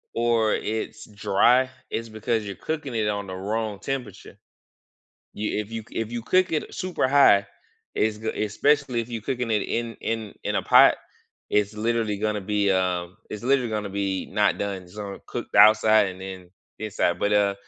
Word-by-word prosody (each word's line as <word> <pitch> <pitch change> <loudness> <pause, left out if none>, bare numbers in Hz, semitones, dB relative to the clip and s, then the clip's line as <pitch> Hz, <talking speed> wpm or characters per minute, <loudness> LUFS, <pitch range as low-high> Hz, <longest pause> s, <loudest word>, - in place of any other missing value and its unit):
or 115 -2 +2
it's 110 +1 -3
dry, 120 +5 +3 0.2
it's 115 0 -4
because 110 0 -2
you're 100 -1 -6
cooking 150 -4 -4
it 110 -2 0
on 100 -1 -2
the 95 - -6
wrong 105 +2 -3
temperature. 135 -4 -6 1.0
You 105 0 -2
if 105 0 -7
you 115 0 -5
c 110 - -15
if 115 -1 -2
you 120 -1 -4
cook 185 +8 +2
it 155 - -2
super 185 -6 -1
high, 130 -8 +5 0.5
it's 105 0 0
g 110 +1 -5 0.2
especially 135 +3 +1
if 115 - -6
you 115 -1 -4
cooking 125 +1 -3
it 105 -2 +2
in 115 -1 -3
in 110 -2 -3
in - - -1
a - - +1
pot, - - +7 0.6
it's 105 0 +1
literally 110 -1 0
gonna 105 0 -1
be, 100 0 0
um, 90 -1 -1
it's 105 +1 -6
literally 130 -2 +2
gonna 105 -2 -3
be 95 -1 -2
not 105 -1 +2
done. 100 -2 -3
It's 90 +4 -17
gonna 100 -2 -6
cook - - -5
the - - +2
outside 110 0 +7
and 95 0 -9
then 95 -2 -8 0.3
inside. 105 -5 -1
But, 100 - 0
uh, 100 -1 +3
110 Hz, 185 wpm, -25 LUFS, 100-115 Hz, 1.0 s, pot